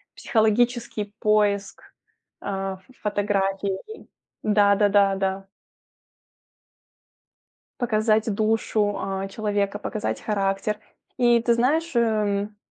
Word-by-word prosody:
психологический 225 -2 0
поиск, 205 -2 +1 0.6
а, 195 -1 -3
в 260 - -22
фотографии. 200 - -2 0.4
Да 205 -1 +4
да 205 0 +3
да 200 -1 +4
да. 195 0 -2 2.3
Показать 215 -1 +2
душу, 215 -1 0
а, 195 0 -3
человека, 205 0 -1
показать 215 0 -3
характер. 200 0 -1 0.4
И 240 -2 +4
ты 235 -1 +3
знаешь, 295 +6 +1
эм, 210 -2 0
210 Hz, 90 wpm, -24 LUFS, 200-220 Hz, 2.3 s, Да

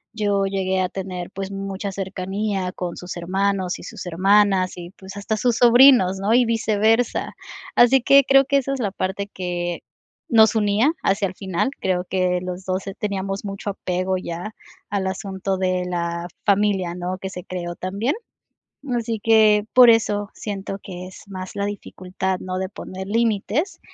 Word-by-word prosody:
yo 205 -2 +1
llegué 190 -1 -1
a 185 -1 0
tener, 185 -1 -6
pues, 195 0 -5
mucha 195 0 -4
cercanía 190 0 -3
con 180 -2 -5
sus 180 0 -7
hermanos 190 +1 -1
y - - -11
sus - - -8
hermanas 190 +1 +3
y, 175 0 -8
pues, 195 0 -11
hasta 215 +2 -2
sus 240 +1 +1
sobrinos, 245 -6 +6
¿no?, 205 +4 +1
y 250 0 +5
viceversa, 225 +1 +1 0.4
así 250 +2 +6
que 275 +3 +6
creo 270 +1 +5
que 280 +1 +2
esa 275 0 -1
es 270 - -4
la 210 -5 -1
parte 195 +1 -3
que 175 -2 -3 0.5
nos 220 -1 +6
unía 215 +6 +3
hacia 195 0 +2
el 185 - -9
final, 190 +5 -1
creo 180 -1 0
que 180 -1 +1
los 180 +1 -5
2, 185 0 -2
eh, 195 - -5
teníamos 195 -2 -3
mucho 200 0 -4
apego 185 0 -2
ya 180 +4 -6 0.4
al 195 -2 -1
asunto 190 0 -3
de 185 -1 0
la 170 -1 -3 0.2
familia, 200 -4 +2
¿no?, 180 +1 -4
que 190 - -5
se 180 - -7
creó 175 -1 -5
también, 200 +10 -2 0.7
mm, 255 -3 -2
así 230 -1 -2
que, 215 -2 +5
por 250 -1 +8
eso 205 -3 +1
siento 195 -1 -5
que 180 -1 -8
es 185 - -12
más 185 -1 -7
la 200 0 -1
dificultad, 190 -2 -4
¿no?, 185 0 -4
de 190 0 -3
poner 190 -1 -8
límites, 230 - 0
195 Hz, 175 wpm, -22 LUFS, 185-215 Hz, 0.7 s, por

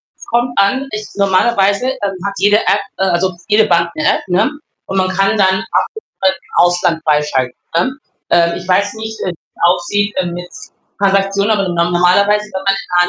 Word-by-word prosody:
es - - -14
kommt 240 +1 0
an, 265 +8 +2
ich 215 0 -4
normalerweise, 200 +3 +2
ähm, 205 -7 -3
hat 200 - -2
jede 205 +1 +4
App, 205 - +1 0.2
äh - - 0
also 185 0 0
jede 215 +1 +4
Bank 170 -3 +2
'ne 155 - -2
App, - - -9
ne, 190 +6 +2 0.4
und 195 - -3
man 185 0 +1
kann 195 +3 +1
dann 190 -1 +2
Abhebungen 440 - -3
im 190 -2 0
Ausland 175 -2 +2
freischalten, 150 -5 +1 0.2
ne? 260 +10 0 0.3
Ähm, 170 0 +3
ich 180 - -9
weiß 200 +2 +2
nicht, 220 0 -7
äh, - - -1
wie's 170 - -12
aussieht, 185 +4 +1
äh, 185 - +1
mit 175 0 -6 0.5
Transaktionen, 195 +1 +1
aber 200 -3 +1
normalerweise, 180 +4 +2
wenn 190 0 -4
man 195 - +3
in 175 -3 +1
195 Hz, 185 wpm, -15 LUFS, 175-205 Hz, 0.5 s, jede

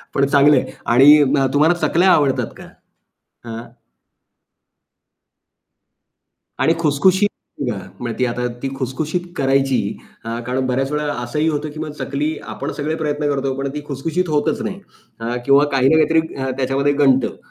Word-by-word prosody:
पण 140 - +3
चांगलं 145 +1 +5
आहे. - - 0 0.2
आणि 145 +5 +7
उम्म, 135 0 +2
तुम्हाला 155 +4 +4
चकल्या 180 +3 +3
आवडतात 140 -5 +2
का? - - -11 0.9
हां. 115 +1 -6 3.0
आणि 165 - +3
खुशखुशीत 185 +7 +3 0.7
म्हणजे 120 -2 -4
ती 125 - +2
आता 125 0 -2 0.2
ती 135 - -2
खुशखुशीत 145 +7 -3 0.2
करायची 135 -1 +2 0.5
अ, 115 +1 -4
कारण 130 +1 -1
बऱ्याच 135 +2 -1
वेळा 150 -2 -1
असंही 150 +6 -1
होतं 150 0 -2
की 155 - -9
मग 155 -1 -4
चकली 150 +3 -2 0.2
आपण - - -5
सगळे 155 +2 -2
प्रयत्न 150 -2 -2
करतो 135 -1 -1
पण 140 0 -2
ती 150 - -4
खुशखुशीत 160 +5 -2
होतच 155 +9 0
नाही 205 -2 -4 0.4
अ, 115 +2 -3
किंवा 140 +1 +5
काही 135 -1 +3
ना 160 - +4
काहीतरी 160 +1 +4 0.4
त्याच्यामध्ये 135 +2 +1
गंडतं, 135 -3 +2
145 Hz, 145 wpm, -19 LUFS, 135-155 Hz, 3.0 s, आणि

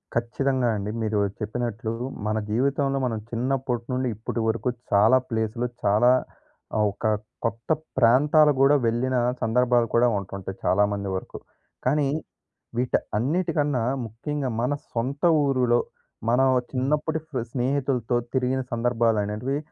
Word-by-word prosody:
ఖచ్చితంగా 125 +2 0
అండి. 105 0 -3
మీరు 110 -1 0 0.2
చెప్పినట్లు 115 0 -3 0.4
మన 110 0 0
జీవితంలో 135 +4 +1
మనం 115 -3 -1
చిన్నప్పటి 125 0 -1
నుండి 130 0 0
ఇప్పటి 115 +2 -4
వరకు 115 +3 0 0.2
చాలా 110 +6 +6
ప్లేసులు 115 +1 -1 0.2
చాలా 105 +5 +4 0.7
ఆహ్, 105 -1 +3
ఒక 100 - -8 0.4
కొత్త 115 0 -3 0.3
ప్రాంతాలు 145 +5 +5
కూడా 140 +2 +6
వెళ్ళిన 125 +3 0 0.3
సందర్భాలు 120 +1 +2
కూడా 120 +1 +5
ఉంటుంటాయి 95 -1 -6
చాలా 100 +2 +4
మంది 100 -1 -3
వరకు. 95 - -6 0.5
కానీ 140 +2 +2 0.7
వీట 125 +1 +1 0.2
అన్నిటికన్నా 145 - 0 0.2
ముఖ్యంగా 130 +5 -4
మన 125 +4 +1 0.2
సొంత 130 +5 -3 0.2
ఊరులో 125 -3 +3 0.5
మనం 130 +3 +4 0.2
చిన్నప్పటి 150 +4 0
ఫ్రె 130 -6 -3
స్నేహితులతో 130 -2 0 0.2
తిరిగిన 130 0 +1
సందర్భాలు 115 -2 +1
అనేటివి 110 +7 -2
125 Hz, 120 wpm, -25 LUFS, 115-135 Hz, 0.7 s, చాలా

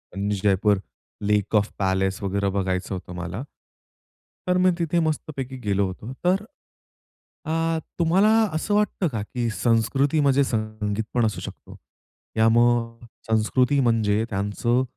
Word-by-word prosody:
आणि 100 +1 -1
जयपूर 100 0 +3 0.4
लेक 105 +1 +1
of 105 0 +3
palace 95 0 0
वगैरे 100 0 0
बघायचं 95 -1 -2
होतं 90 -1 -8
मला. 90 +6 -5 1.0
तर 180 0 +3
मी 185 0 +4
तिथे 170 0 +1
मस्तपैकी 145 -4 -3
गेलो 100 -1 +2
होतो. 105 +7 -7
तर 190 +3 +2 1.0
अ, 165 +1 0 0.2
तुम्हाला 180 +5 +4 0.2
असं 160 +6 -1
वाटतं 210 -3 +1
का, 115 -8 -3
की 120 +2 -3
संस्कृती 120 +7 +1
म्हणजे 140 -1 +4
संगीत 110 -3 -2
पण 120 -2 +2
असू 110 - -2
शकतो? - - -10 0.6
या 110 0 +5
मग 120 0 +2 0.2
संस्कृती 125 +5 +2
म्हणजे 110 -4 +2
त्यांचं 105 +5 0
115 Hz, 130 wpm, -24 LUFS, 100-140 Hz, 1.0 s, या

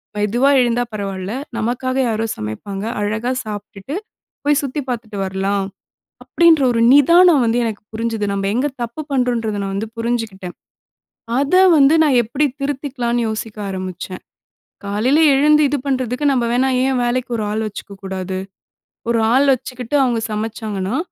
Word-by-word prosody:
மெதுவா 215 +6 +2
எழுந்தா 240 0 +1
பரவால்ல, 195 -1 -4 0.2
நமக்காக 250 +3 -1
யாரோ 225 -1 -1
சமைப்பாங்க. 150 - -5 0.2
அழகா 220 +4 -1
சாப்ட்டுட்டு, 210 +4 -7 0.5
போய் 290 -1 +3
சுத்தி 280 +2 -3
பாத்துட்டு 225 -4 -4
வரலாம். 195 +1 -1 0.6
அப்படின்ற 335 -4 +4
ஒரு 230 - 0
நிதானம் 335 +1 +6
வந்து, 230 +1 +1
எனக்கு 220 -3 -4
புரிஞ்சுது. 225 -1 -2
நம்ம 195 0 -2
எங்க 255 +5 +1 0.2
தப்பு 235 +6 -5
பண்றோம்ன்றத, 240 -5 0
நான் 195 0 -3
வந்து 215 +3 -3
புரிஞ்சுக்கிட்டேன். 225 -6 -3 0.9
அத 285 +4 -1 0.2
வந்து, 280 +1 +6
நான் 285 -5 +3
எப்படி 240 +7 0
திருத்திக்கலான்னு 260 -4 -2
யோசிக்க 220 0 -5
ஆரம்பிச்சன். 185 -1 -6 0.6
காலையில 220 +9 +2 0.2
எழுந்து 300 +2 +4
இது 290 - 0
பண்றதுக்கு, 260 0 -1
நம்ம 250 -3 +1
வேணா 260 +2 +2 0.2
ஏன் 265 -2 +1
வேலைக்கு 245 +1 -1
ஒரு 215 - -2
ஆள் 220 +1 -1
வச்சுக்க 205 -1 -9
கூடாது! 190 -1 -4 0.7
"ஒரு 235 - +2
ஆள் 275 +2 +4
வச்சுக்கிட்டு, 255 +1 -4
அவுங்க 240 -3 0
சமைச்சாங்கன்னா, 215 0 -3
230 Hz, 140 wpm, -19 LUFS, 205-260 Hz, 0.9 s, நிதானம்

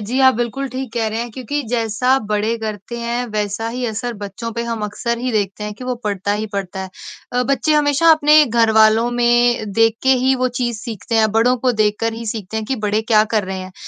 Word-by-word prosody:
जी, 235 +6 -3
आप 260 -2 +6
बिल्कुल 240 +4 -3
ठीक 255 -1 -6
कह 230 -2 -1
रहे 220 +1 -3
हैं 240 0 -5
क्योंकि 265 +5 -4
जैसा 245 +3 +1
बड़े 215 +2 0
करते 215 +1 -6
हैं 235 +1 -2
वैसा 210 +1 -2
ही 250 +2 -4
असर 235 +2 -3
बच्चों 205 +4 -5
पे 235 +1 -3
हम 230 -2 -4
अक्सर 235 +3 -3
ही 250 +1 -2
देखते 205 -1 -1
हैं 210 0 -5
कि 250 - -10
वो 250 0 -2
पड़ता 200 0 -1
ही 215 +1 -2
पड़ता 190 -1 -4
है। 190 - -8 0.4
अ, 250 0 +1
बच्चे 275 +4 +1
हमेशा 295 +2 +4
अपने 300 0 +5
घरवालों 225 0 +4
में 240 -3 +2
देख 225 +1 +3
के 265 0 +4
ही 265 0 +4
वो - - +3
चीज़ 240 -2 -1
सीखते 225 0 -5
हैं। 220 -1 +3
बड़ों 240 +3 +3
को 250 - +4
देखकर 215 +2 0
ही 230 +1 -7
सीखते 215 -1 -4
हैं 220 - -3
कि 265 - -1
बड़े 210 +2 +1
क्या 215 0 +6
कर 210 -3 +2
रहे 190 0 -5
हैं। 185 0 -8
230 Hz, 230 wpm, -19 LUFS, 215-250 Hz, 0.4 s, आप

